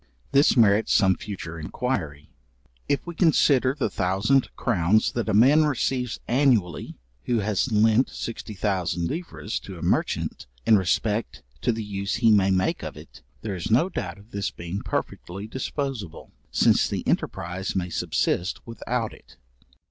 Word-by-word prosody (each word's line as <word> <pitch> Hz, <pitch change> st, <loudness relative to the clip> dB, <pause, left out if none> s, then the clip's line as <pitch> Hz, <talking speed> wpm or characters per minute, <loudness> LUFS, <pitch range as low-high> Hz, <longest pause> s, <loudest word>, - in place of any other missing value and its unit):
This 140 Hz, 0 st, +4 dB
merits 110 Hz, -1 st, +4 dB
some 95 Hz, -3 st, +4 dB
future 85 Hz, -5 st, -7 dB
inquiry. 80 Hz, -, -3 dB, 0.6 s
If 140 Hz, -, 0 dB
we 175 Hz, -, -6 dB
consider 140 Hz, -6 st, +3 dB
the 135 Hz, -, +1 dB
thousand 100 Hz, +8 st, +1 dB
crowns 105 Hz, -1 st, +2 dB
that 120 Hz, -2 st, -2 dB
a -, -, +1 dB
man 140 Hz, +8 st, +6 dB
receives 125 Hz, -3 st, -1 dB
annually, 120 Hz, -9 st, +1 dB, 0.3 s
who 120 Hz, -3 st, +1 dB
has 105 Hz, +5 st, 0 dB
lent 110 Hz, +4 st, +4 dB
60,000 95 Hz, -6 st, -3 dB
livres, 160 Hz, -, -4 dB
to 95 Hz, -2 st, -10 dB
a -, -, -8 dB
merchant, -, -, -1 dB, 0.2 s
in 110 Hz, -, +6 dB
respect 105 Hz, -, 0 dB, 0.2 s
to 120 Hz, -, +2 dB
the 110 Hz, -1 st, -3 dB
use 100 Hz, 0 st, -3 dB
he 115 Hz, -1 st, +4 dB
may 100 Hz, -2 st, +4 dB
make 95 Hz, 0 st, +1 dB
of -, -, -7 dB
it, -, -, -13 dB, 0.2 s
there 105 Hz, -3 st, -3 dB
is 85 Hz, -, -4 dB
no 125 Hz, +12 st, +3 dB
doubt 95 Hz, -, -4 dB
of 100 Hz, +3 st, -18 dB
this 100 Hz, -1 st, -2 dB
being 85 Hz, +3 st, -6 dB
perfectly 95 Hz, +4 st, -4 dB
disposable, 130 Hz, -, -5 dB, 0.2 s
since -, -, +4 dB
the -, -, -3 dB
enterprize 90 Hz, +2 st, -2 dB
may 90 Hz, -2 st, -2 dB
subsist 90 Hz, +2 st, -1 dB
without 115 Hz, 0 st, -3 dB
it. -, -, -18 dB
105 Hz, 150 wpm, -25 LUFS, 95-125 Hz, 0.6 s, man